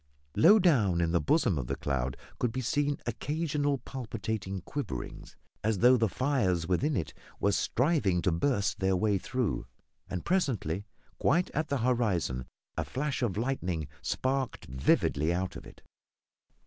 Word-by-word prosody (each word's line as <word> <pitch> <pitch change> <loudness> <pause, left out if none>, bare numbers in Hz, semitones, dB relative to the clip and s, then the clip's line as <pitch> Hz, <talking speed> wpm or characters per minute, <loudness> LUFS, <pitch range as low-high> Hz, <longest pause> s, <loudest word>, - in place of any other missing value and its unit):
Low 200 +7 +7
down 120 - +3
in 85 -1 +1
the 85 - +2
bosom 140 - +2
of 60 - -4
the - - -1
cloud 65 -2 -2 0.2
could 125 - +1
be 130 - -3
seen 145 +3 0
occasional 145 +3 -1
palpitating 110 -6 -4
quiverings, 85 - -6 0.3
as 110 -1 +1
though 125 +6 +6
the 115 -3 +2
fires 95 - +1
within 135 - +1
it 80 - -3 0.3
were 100 - +3
striving 115 - +2
to 90 - +3
burst 100 +4 0
their 95 0 +2
way 100 +1 +2
through, 125 - -2 0.4
and 90 - -4
presently, 110 - 0 0.3
quite 170 +7 +2
at 155 0 -1
the 140 - 0
horizon, 95 - +1 0.3
a - - -1
flash 140 +1 -2
of 110 -6 0
lightning 95 - -1
sparked 130 0 -1
vividly 70 +4 +2
out 90 +1 -2
of - - -9
it. - - -15
110 Hz, 150 wpm, -30 LUFS, 90-140 Hz, 0.4 s, Low